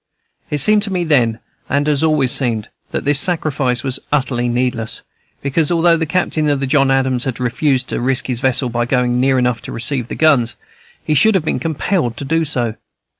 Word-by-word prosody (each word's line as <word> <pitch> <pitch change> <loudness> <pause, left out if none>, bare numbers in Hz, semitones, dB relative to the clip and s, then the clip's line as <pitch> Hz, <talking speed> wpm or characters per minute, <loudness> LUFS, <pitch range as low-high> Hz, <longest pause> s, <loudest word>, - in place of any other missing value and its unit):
It 150 - -1
seemed 210 +9 +4
to 205 -1 -3
me 180 -2 -1
then, 125 -9 +2 0.3
and 145 +1 +1
has 150 0 +1
always 150 -5 +2
seemed, 115 -5 0 0.2
that - - -4
this 145 0 +4
sacrifice 145 -8 +1
was 130 -1 -1
utterly 130 -4 0
needless, 120 -2 -2 0.4
because, 145 +3 0
although 170 0 +3
the 165 -1 -2
captain 155 -3 0
of 145 -1 +1
the 135 - -1
John 135 0 +2
Adams 130 -1 +1
had 130 -3 -3
refused 130 +2 0
to - - -2
risk 130 +1 0
his 125 -3 -2
vessel 130 -1 +1
by 120 0 -1
going 125 -1 +1
near 130 +1 +2
enough 125 -2 0
to - - -8
receive 120 +1 -1
the - - -6
guns, 135 -7 +2 0.5
he 155 - +1
should 210 +9 +4
have 170 -5 0
been - - -1
compelled 160 - -1
to 140 - -6
do 165 +3 0
so. 120 -6 -2
135 Hz, 205 wpm, -17 LUFS, 125-155 Hz, 0.5 s, seemed